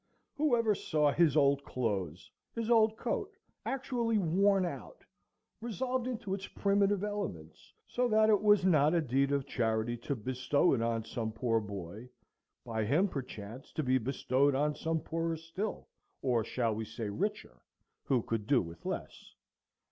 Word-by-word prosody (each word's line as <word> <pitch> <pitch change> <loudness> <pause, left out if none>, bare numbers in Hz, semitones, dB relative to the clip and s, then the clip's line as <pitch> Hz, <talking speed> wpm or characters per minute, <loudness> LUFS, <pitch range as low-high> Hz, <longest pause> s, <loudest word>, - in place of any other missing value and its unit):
Who 295 -4 +3
ever 230 -2 +2
saw 150 -6 +1
his 155 -2 +3
old 140 -1 +4
clothes,—his 110 - -4
old 220 -1 +4
coat, - - -3 0.3
actually 245 -4 0
worn 195 +1 +3
out, 180 - -7 0.6
resolved 250 +2 -2
into 220 -6 -3
its 195 0 -4
primitive 200 0 +1
elements, 190 - -5
so 250 0 0
that 220 -1 +4
it 210 -2 +4
was 205 -3 +5
not 155 -3 +4
a 170 - +3
deed 135 0 +1
of 140 -1 0
charity 115 -3 0
to 130 +4 -3
bestow 130 +7 +1
it 125 - +1
on 115 -1 0
some 110 -2 -3
poor 115 0 +1
boy, 100 +2 -7 0.6
by 110 -2 -2
him 155 - +2
perchance 125 - -7
to 155 - -1
be 130 0 +2
bestowed 135 +2 +1
on 150 +2 +1
some 160 +1 -2
poorer 165 0 -2
still, 165 +7 -5 0.4
or 120 -4 +2
shall 115 0 -1
we 110 +1 -3
say 110 0 -5
richer, 100 +1 -3 0.4
who 125 -4 +1
could 110 -2 -3
do 140 -2 +4
with 85 -3 -7
less? - - -6
145 Hz, 155 wpm, -32 LUFS, -, 0.6 s, was